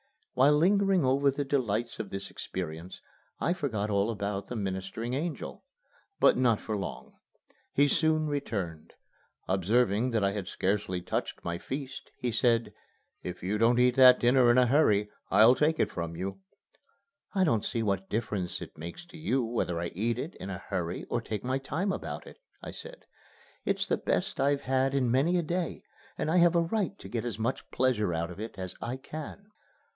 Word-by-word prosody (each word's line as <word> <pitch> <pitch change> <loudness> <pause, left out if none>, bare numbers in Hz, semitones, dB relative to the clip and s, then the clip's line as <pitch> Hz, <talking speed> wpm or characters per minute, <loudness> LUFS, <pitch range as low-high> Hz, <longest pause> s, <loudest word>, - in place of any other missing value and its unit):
While 135 +3 +5
lingering 190 +1 +3
over 140 +2 +3
the 140 +1 -2
delights 120 -4 -1
of 110 -3 -4
this 95 0 -6
experience 85 0 -6 0.4
I 170 - +1
forgot 110 - -2
all 100 +2 +2
about 100 -2 -3
the 125 - -5
ministering 100 +3 -3
angel. 155 +5 -4 0.6
But - - +5
not 120 -4 +3
for 110 - -3
long. 100 - -6 0.6
He 145 +1 +4
soon 155 +1 +2
returned. 105 - -4 0.5
Observing 105 +5 +2
that 110 -3 +1
I 100 - +3
had 100 -3 -4
scarcely 95 -2 -1
touched 90 - -3
my 85 0 -3
feast, 135 +3 -6
he 125 - -2
said, 115 +1 +2 0.5
"If 90 0 -7
you 100 +3 -1
don't 115 +2 +4
eat 125 0 +4
that 130 -1 +8
dinner 125 0 +5
in 120 - +5
a 125 - +6
hurry, 105 -6 +3 0.2
I'll 110 +5 +7
take 150 +4 +1
it - - +2
from 85 -1 -4
you." 95 +3 -4 1.0
"I 190 - +4
don't 115 - +2
see 115 - -1
what 100 -2 -1
difference 105 -5 -2
it - - -9
makes 85 - -8
to 175 -1 -12
you 135 -5 +1
whether 110 -7 -1
I 85 0 -2
eat 115 +5 -1
it 155 +8 -4
in 95 - -7
a 95 - -4
hurry 90 -2 -3
or 120 - +1
take 105 -3 -4
my 130 +2 0
time 165 +8 -2
about - - -5
it," - - -13 0.2
I - - -6
said. - - -11 0.6
"It's - - +1
the - - +1
best 195 +3 -1
I've 140 0 +2
had 135 +1 +1
in 125 -4 +2
many 150 +8 +3
a 175 - +1
day, 175 +2 -2 0.3
and 155 - -1
I 180 - +3
have 175 0 +5
a 170 - +5
right 200 +2 -1
to - - -10
get 115 -2 -2
as 115 -4 -3
much 115 +4 -2
pleasure 110 -9 +1
out 85 +2 -2
of 90 - -10
it 110 -1 -6
as 95 -1 -4
I 120 +3 -3
can." 155 +9 -8
120 Hz, 190 wpm, -29 LUFS, 100-140 Hz, 1.0 s, that